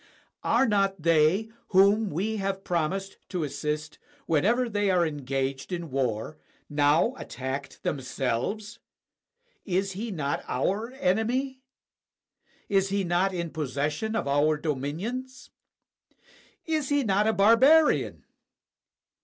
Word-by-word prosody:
Are 270 Hz, -, +3 dB
not 195 Hz, -5 st, +1 dB
they 165 Hz, +7 st, +3 dB, 0.2 s
whom 200 Hz, +2 st, +4 dB
we 205 Hz, +8 st, -2 dB
have 195 Hz, -1 st, -2 dB
promised 180 Hz, +3 st, -2 dB
to 180 Hz, -4 st, -2 dB
assist, 150 Hz, +2 st, -4 dB, 0.3 s
whenever 220 Hz, +11 st, +2 dB
they 205 Hz, -2 st, 0 dB
are 180 Hz, -2 st, +3 dB
engaged 135 Hz, -1 st, -3 dB
in 170 Hz, -4 st, -4 dB
war, 130 Hz, +2 st, -2 dB, 0.3 s
now 145 Hz, -, +3 dB
attacked 135 Hz, +1 st, -6 dB
themselves? 135 Hz, -, -2 dB, 0.8 s
Is 195 Hz, +1 st, -1 dB
he 210 Hz, +5 st, -5 dB
not 150 Hz, -8 st, -2 dB
our 205 Hz, -, -1 dB
enemy? 255 Hz, +5 st, 0 dB, 1.1 s
Is 195 Hz, -1 st, +2 dB
he 200 Hz, 0 st, 0 dB
not 175 Hz, +2 st, +1 dB
in 170 Hz, -3 st, -4 dB
possession 150 Hz, -, -2 dB
of 225 Hz, -, -1 dB
our 145 Hz, +2 st, +2 dB
dominions? 170 Hz, -, -4 dB, 1.1 s
Is 310 Hz, -4 st, -1 dB
he 285 Hz, -1 st, +2 dB
not 205 Hz, -1 st, +2 dB
a 220 Hz, -, +3 dB
barbarian? 260 Hz, +11 st, +4 dB
185 Hz, 110 wpm, -27 LUFS, 150-215 Hz, 1.1 s, whom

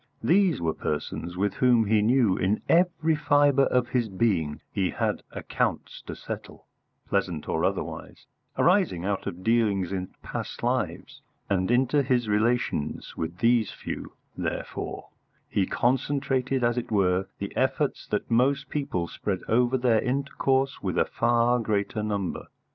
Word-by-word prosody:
These 180 Hz, -4 st, +3 dB
were 80 Hz, -2 st, 0 dB
persons 85 Hz, +4 st, -4 dB
with 100 Hz, +2 st, 0 dB
whom 120 Hz, -3 st, +3 dB
he 105 Hz, 0 st, +3 dB
knew 115 Hz, -3 st, +3 dB
in 100 Hz, +4 st, 0 dB
every 165 Hz, -2 st, +3 dB
fibre 145 Hz, -2 st, +4 dB
of 125 Hz, -1 st, +1 dB
his 120 Hz, -3 st, 0 dB
being 95 Hz, -7 st, 0 dB
he 95 Hz, -2 st, 0 dB
had -, -, -1 dB
accounts -, -, -2 dB
to -, -, -5 dB
settle, -, -, -8 dB, 0.4 s
pleasant 90 Hz, -6 st, -1 dB
or -, -, -1 dB
otherwise, -, -, -3 dB, 0.3 s
arising 175 Hz, -, +2 dB
out 100 Hz, -1 st, -2 dB
of 90 Hz, +2 st, -6 dB
dealings 105 Hz, -5 st, +2 dB
in 95 Hz, -1 st, -3 dB, 0.2 s
past -, -, -6 dB
lives; -, -, -2 dB, 0.3 s
and 95 Hz, -2 st, +1 dB
into 130 Hz, +4 st, +3 dB
his 125 Hz, -3 st, +1 dB
relations 105 Hz, -7 st, 0 dB
with 80 Hz, +2 st, -4 dB
these 115 Hz, 0 st, +3 dB
few, -, -, -7 dB, 0.2 s
therefore, -, -, -4 dB, 0.4 s
he 95 Hz, -2 st, 0 dB
concentrated 130 Hz, 0 st, 0 dB
as 120 Hz, +1 st, +2 dB
it 120 Hz, -, -7 dB
were 95 Hz, -2 st, +2 dB
the 100 Hz, -, -6 dB
efforts 135 Hz, +2 st, 0 dB
that 105 Hz, +3 st, -2 dB
most 135 Hz, +4 st, +2 dB
people 140 Hz, -, -2 dB
spread 95 Hz, +2 st, -3 dB
over 125 Hz, +3 st, +3 dB
their 120 Hz, -3 st, +3 dB
intercourse 135 Hz, 0 st, 0 dB
with 90 Hz, -3 st, -2 dB
a -, -, +4 dB
far 120 Hz, +1 st, +2 dB
greater 105 Hz, -1 st, -1 dB
number. 100 Hz, -3 st, -3 dB
115 Hz, 145 wpm, -26 LUFS, 95-130 Hz, 0.4 s, fibre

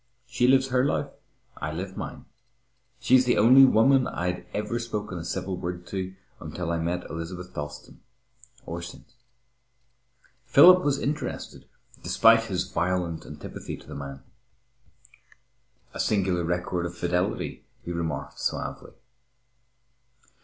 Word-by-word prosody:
She 125 Hz, 0 st, +1 dB
lives 135 Hz, 0 st, +4 dB
her 125 Hz, 0 st, +2 dB
life, 145 Hz, -, 0 dB, 0.5 s
I -, -, -4 dB
live -, -, -5 dB
mine. -, -, -7 dB, 0.7 s
She's 130 Hz, 0 st, +5 dB
the 120 Hz, -, +2 dB
only 130 Hz, +5 st, +8 dB
woman 130 Hz, +2 st, +4 dB
I'd 90 Hz, +1 st, -3 dB
ever 110 Hz, +3 st, -2 dB
spoken 105 Hz, -5 st, -4 dB
a -, -, -6 dB
civil 90 Hz, +2 st, -3 dB
word 90 Hz, 0 st, -5 dB
to 95 Hz, -1 st, -4 dB, 0.2 s
until 90 Hz, -2 st, -4 dB
I 85 Hz, -, 0 dB
met 85 Hz, +2 st, -2 dB
Elizabeth 90 Hz, +2 st, -7 dB
Dalstan, 75 Hz, 0 st, -7 dB, 0.7 s
or 85 Hz, +1 st, -5 dB
since." 85 Hz, -, -11 dB, 1.3 s
Philip 180 Hz, 0 st, +8 dB
was 140 Hz, -1 st, +1 dB
interested 145 Hz, +2 st, -4 dB, 0.4 s
despite 115 Hz, 0 st, +5 dB
his 90 Hz, -4 st, -1 dB
violent 90 Hz, -2 st, -2 dB
antipathy -, -, -7 dB
to -, -, -16 dB
the -, -, -10 dB
man. 70 Hz, -1 st, -7 dB, 1.7 s
"A -, -, -8 dB
singular 95 Hz, -4 st, +1 dB
record 90 Hz, +1 st, -1 dB
of 85 Hz, +1 st, -10 dB
fidelity," 90 Hz, +1 st, -1 dB, 0.2 s
he 85 Hz, -, -5 dB
remarked 80 Hz, -5 st, -4 dB
suavely. -, -, -4 dB
90 Hz, 125 wpm, -26 LUFS, 85-115 Hz, 1.7 s, only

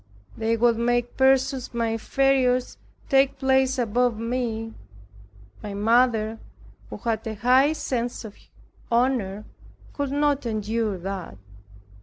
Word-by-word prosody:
They 225 Hz, +1 st, 0 dB
would 235 Hz, 0 st, +3 dB
make 240 Hz, 0 st, 0 dB
persons 265 Hz, -1 st, +2 dB
my 230 Hz, -1 st, 0 dB
inferiors 255 Hz, +2 st, +1 dB, 0.3 s
take 270 Hz, 0 st, +3 dB
place 265 Hz, 0 st, +2 dB
above 245 Hz, 0 st, +1 dB
me. 225 Hz, -1 st, -3 dB, 0.9 s
My 205 Hz, -1 st, -6 dB
mother, 225 Hz, 0 st, +2 dB, 0.5 s
who -, -, -7 dB
had 225 Hz, -2 st, -3 dB
a 220 Hz, -, -4 dB
high 255 Hz, +7 st, +4 dB
sense 245 Hz, -6 st, -3 dB
of 210 Hz, -, -9 dB, 0.6 s
honor, 230 Hz, -5 st, 0 dB, 0.5 s
could 285 Hz, -2 st, -3 dB
not 285 Hz, -2 st, +1 dB
endure 215 Hz, -1 st, -2 dB
that. 185 Hz, -, -6 dB
240 Hz, 115 wpm, -24 LUFS, 220-265 Hz, 0.9 s, high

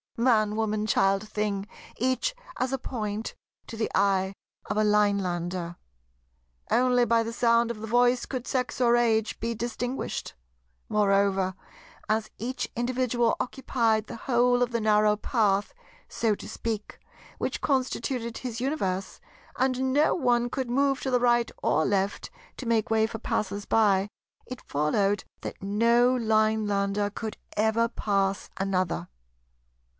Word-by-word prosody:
Man, 220 Hz, -3 st, +3 dB
woman, 215 Hz, -1 st, 0 dB
child, 195 Hz, 0 st, +2 dB
thing—each 215 Hz, -, -2 dB, 0.2 s
as 255 Hz, 0 st, -1 dB
a -, -, +1 dB
Point 220 Hz, -4 st, -4 dB, 0.3 s
to -, -, -8 dB
the 220 Hz, 0 st, -1 dB
eye 195 Hz, -1 st, +2 dB, 0.3 s
of -, -, -2 dB
a 215 Hz, -, +3 dB
Linelander. 185 Hz, -4 st, 0 dB, 0.9 s
Only 245 Hz, 0 st, +3 dB
by 230 Hz, -1 st, +3 dB
the 230 Hz, +1 st, -5 dB
sound 235 Hz, 0 st, +3 dB
of 225 Hz, -, -7 dB
the 220 Hz, -, -6 dB
voice 245 Hz, +2 st, +3 dB
could 255 Hz, -2 st, -4 dB
sex 255 Hz, -1 st, -2 dB
or 240 Hz, -1 st, +4 dB
age 225 Hz, -2 st, +1 dB
be 230 Hz, +1 st, -2 dB
distinguished. 240 Hz, +3 st, -4 dB, 0.6 s
Moreover, 195 Hz, -2 st, +2 dB, 0.5 s
as 215 Hz, 0 st, 0 dB
each 250 Hz, +4 st, -3 dB
individual 240 Hz, -1 st, +1 dB
occupied 230 Hz, -4 st, 0 dB
the -, -, -7 dB
whole 245 Hz, +1 st, +2 dB
of 245 Hz, -1 st, +1 dB
the 235 Hz, -1 st, -1 dB
narrow 210 Hz, -1 st, +4 dB
path, 210 Hz, -2 st, +1 dB, 0.3 s
so 220 Hz, -2 st, 0 dB
to -, -, -10 dB
speak, 220 Hz, -2 st, -4 dB, 0.4 s
which -, -, -2 dB
constituted 255 Hz, -3 st, -1 dB
his 240 Hz, -2 st, -5 dB
Universe, 195 Hz, -10 st, -2 dB, 0.4 s
and 260 Hz, 0 st, +1 dB
no 295 Hz, +3 st, +4 dB
one 245 Hz, -5 st, +1 dB
could 260 Hz, -3 st, -3 dB
move 275 Hz, +1 st, +2 dB
to 265 Hz, -, -2 dB
the 250 Hz, -, +3 dB
right 240 Hz, -1 st, +3 dB
or 155 Hz, -, +2 dB
left 200 Hz, 0 st, -1 dB, 0.3 s
to 255 Hz, -, -6 dB
make 225 Hz, -1 st, +1 dB
way 220 Hz, 0 st, +3 dB
for 225 Hz, 0 st, -7 dB
passers 200 Hz, 0 st, -2 dB
by, 200 Hz, -3 st, +3 dB, 0.4 s
it 255 Hz, 0 st, -7 dB
followed 195 Hz, +8 st, 0 dB, 0.2 s
that -, -, -7 dB
no 235 Hz, +5 st, +3 dB
Linelander 215 Hz, -3 st, +1 dB
could 220 Hz, 0 st, -5 dB, 0.2 s
ever 220 Hz, +2 st, +2 dB
pass 195 Hz, -3 st, -1 dB
another. 185 Hz, -, -1 dB
225 Hz, 140 wpm, -27 LUFS, 205-245 Hz, 0.9 s, or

